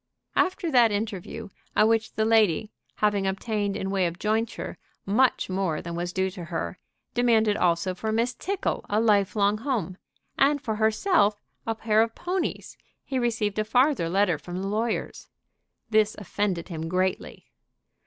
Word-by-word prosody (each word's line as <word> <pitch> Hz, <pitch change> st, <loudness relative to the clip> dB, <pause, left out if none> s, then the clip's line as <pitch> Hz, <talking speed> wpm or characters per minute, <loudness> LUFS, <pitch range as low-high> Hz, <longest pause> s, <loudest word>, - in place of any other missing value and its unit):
After 365 Hz, -3 st, +1 dB
that 240 Hz, -4 st, +5 dB
interview, 210 Hz, 0 st, -4 dB, 0.3 s
at 215 Hz, -, +5 dB
which 225 Hz, -1 st, +1 dB
the 220 Hz, -, +1 dB
lady, 220 Hz, -3 st, +3 dB, 0.2 s
having 205 Hz, -2 st, +1 dB
obtained 200 Hz, +1 st, -1 dB
in 195 Hz, -, -3 dB
way 190 Hz, -2 st, +2 dB
of 170 Hz, 0 st, -6 dB
jointure 220 Hz, +3 st, -2 dB, 0.3 s
much 235 Hz, +6 st, +2 dB
more 185 Hz, -4 st, -1 dB
than 170 Hz, -, -6 dB
was 175 Hz, +1 st, -3 dB
due 190 Hz, +1 st, 0 dB
to 180 Hz, -3 st, -8 dB
her, 170 Hz, +1 st, -4 dB, 0.3 s
demanded 225 Hz, -3 st, +3 dB
also 175 Hz, 0 st, +1 dB
for 220 Hz, +4 st, -3 dB
Miss 230 Hz, +3 st, +1 dB
Tickle 390 Hz, +8 st, -2 dB
a 210 Hz, 0 st, +2 dB
life 205 Hz, -4 st, +3 dB
long 205 Hz, 0 st, +2 dB
home, 215 Hz, -, -2 dB, 0.4 s
and 285 Hz, +1 st, +4 dB
for 220 Hz, -5 st, -3 dB
herself 220 Hz, -, +2 dB, 0.3 s
a 225 Hz, -, 0 dB
pair 220 Hz, -1 st, +2 dB
of 225 Hz, 0 st, 0 dB
ponies, 360 Hz, 0 st, -3 dB, 0.3 s
he 265 Hz, -2 st, -2 dB
received 220 Hz, -4 st, 0 dB
a -, -, +2 dB
farther 245 Hz, -, +2 dB
letter 185 Hz, -3 st, +2 dB
from 175 Hz, +3 st, -6 dB
the -, -, -2 dB
lawyers. 220 Hz, +3 st, -2 dB, 0.6 s
This 215 Hz, 0 st, +3 dB
offended 195 Hz, -3 st, -2 dB
him 165 Hz, -1 st, -4 dB
greatly. 185 Hz, +1 st, -2 dB
210 Hz, 160 wpm, -26 LUFS, 190-225 Hz, 0.6 s, that